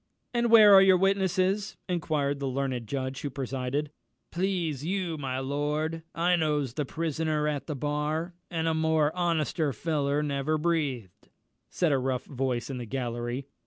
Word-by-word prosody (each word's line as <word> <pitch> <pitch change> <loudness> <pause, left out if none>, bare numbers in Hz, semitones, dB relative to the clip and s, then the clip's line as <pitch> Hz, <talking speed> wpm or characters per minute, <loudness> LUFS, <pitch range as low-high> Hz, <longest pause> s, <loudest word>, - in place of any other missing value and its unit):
"And 240 -1 +1
where 215 -3 +9
are 195 - +10
your 190 -1 +6
witnesses?" 195 +1 +1
inquired 150 -5 -1
the 140 - -2
learned 130 -3 -2
judge 135 +1 -3
who 145 - -3
presided. 135 +2 -3 0.4
"Please 175 -6 -1
you, 180 -1 -1
my 135 -4 -3
lord, 150 +4 -2
I 175 +2 +3
knows 150 -6 0
the 150 +2 -2
prisoner 155 0 -1
at 145 -2 -2
the 150 - -3
bar, 150 +5 -2 0.2
and 165 -1 -1
a 160 - +2
more 160 -1 +2
honester 165 -3 0
feller 145 +1 0
never 145 +1 0
breathed," 145 - -2 0.4
said 175 -4 +1
a 135 - +3
rough 130 0 -2
voice 130 -3 -2
in 130 - -4
the 120 - -6
gallery. 120 +1 -3
150 Hz, 160 wpm, -28 LUFS, 135-170 Hz, 0.4 s, are